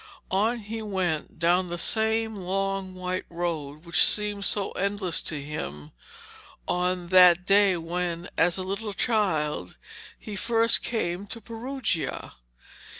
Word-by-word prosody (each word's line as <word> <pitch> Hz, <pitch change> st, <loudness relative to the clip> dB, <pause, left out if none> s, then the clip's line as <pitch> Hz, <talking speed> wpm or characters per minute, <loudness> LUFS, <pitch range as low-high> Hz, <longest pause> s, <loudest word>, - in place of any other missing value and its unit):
On 215 Hz, +6 st, +2 dB
he 225 Hz, 0 st, -6 dB
went 185 Hz, -7 st, -2 dB
down 175 Hz, +2 st, +2 dB
the 175 Hz, 0 st, -4 dB
same 220 Hz, +3 st, +1 dB
long 195 Hz, 0 st, -2 dB
white 185 Hz, 0 st, -3 dB
road 165 Hz, -3 st, -4 dB
which 170 Hz, -, +1 dB
had -, -, +9 dB
seemed 205 Hz, -1 st, +1 dB
so 200 Hz, -2 st, -1 dB
endless 195 Hz, -3 st, -1 dB
to 155 Hz, -, -4 dB
him 80 Hz, -, -6 dB, 0.8 s
that 180 Hz, 0 st, +4 dB
day 195 Hz, -1 st, +5 dB
when, 170 Hz, +1 st, -3 dB
as 170 Hz, +2 st, +3 dB
a 185 Hz, -, -3 dB
little 200 Hz, +3 st, -4 dB
child, 160 Hz, -, 0 dB, 0.4 s
he 210 Hz, -, -8 dB
first 230 Hz, +3 st, +3 dB
came 200 Hz, -4 st, -3 dB
to 230 Hz, -, -5 dB
Perugia. 230 Hz, -, -4 dB
185 Hz, 130 wpm, -26 LUFS, 170-210 Hz, 0.8 s, had